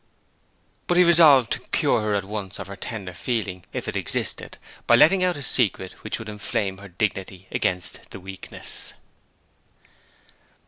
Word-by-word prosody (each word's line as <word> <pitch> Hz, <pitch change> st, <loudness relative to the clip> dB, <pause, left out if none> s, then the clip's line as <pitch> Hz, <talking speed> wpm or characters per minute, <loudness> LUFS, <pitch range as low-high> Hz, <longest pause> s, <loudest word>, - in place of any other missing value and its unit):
But 175 Hz, -, +2 dB
he 180 Hz, -, +8 dB
resolved 155 Hz, -, +6 dB
to -, -, 0 dB
cure 105 Hz, -1 st, +1 dB
at 100 Hz, -1 st, -1 dB
once 100 Hz, -1 st, -5 dB
her 100 Hz, -, -7 dB
tender 100 Hz, -2 st, -6 dB
feeling, 100 Hz, -5 st, -3 dB
if -, -, -5 dB
it -, -, -3 dB
existed, -, -, -1 dB, 0.3 s
by -, -, +7 dB
letting 185 Hz, +4 st, +6 dB
out 180 Hz, -3 st, +1 dB
a 145 Hz, -, -6 dB
secret 100 Hz, -8 st, +2 dB
which 110 Hz, -, -3 dB
would 110 Hz, -, -9 dB
inflame 100 Hz, -2 st, -3 dB
her 100 Hz, -, -10 dB
dignity 95 Hz, 0 st, -3 dB
against 90 Hz, -1 st, -2 dB
the -, -, -9 dB
weakness. 95 Hz, 0 st, -6 dB
105 Hz, 145 wpm, -24 LUFS, 95-125 Hz, 0.3 s, he